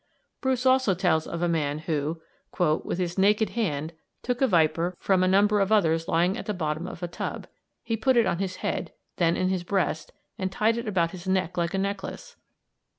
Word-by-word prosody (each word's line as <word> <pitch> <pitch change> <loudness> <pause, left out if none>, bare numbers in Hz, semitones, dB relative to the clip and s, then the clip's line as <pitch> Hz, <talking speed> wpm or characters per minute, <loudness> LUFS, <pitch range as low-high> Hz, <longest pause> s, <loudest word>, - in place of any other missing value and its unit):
Bruce 260 -1 0
also 260 -6 +4
tells 170 -4 +1
of 170 +1 -4
a - - +3
man 150 -3 0
who 155 0 -2 0.6
"with - - -4
his 180 0 -2
naked 210 +3 +3
hand 160 -8 -2 0.3
took 245 +1 -2
a 265 - +5
viper 170 -1 +2
from 190 -2 +2
a 185 - +3
number 205 +2 +4
of 195 +1 +1
others 165 -6 +3
lying 175 +2 +2
at - - -7
the 210 - -1
bottom 160 0 -2
of 175 - -8
a - - -1
tub. 170 - -5 0.4
He 230 -1 -1
put 250 +3 +2
it 230 - +5
on 170 -2 0
his 190 -1 -2
head, - - -2 0.2
then 170 -2 +2
in 185 - +1
his 185 -2 -1
breast, 175 -4 -1 0.3
and 190 0 -2
tied 220 +4 +2
it 235 -1 -4
about 175 -5 +1
his 185 0 -9
neck 185 -2 0
like 170 +1 -1
a - - 0
necklace. 200 0 -4
185 Hz, 210 wpm, -26 LUFS, 170-205 Hz, 0.6 s, a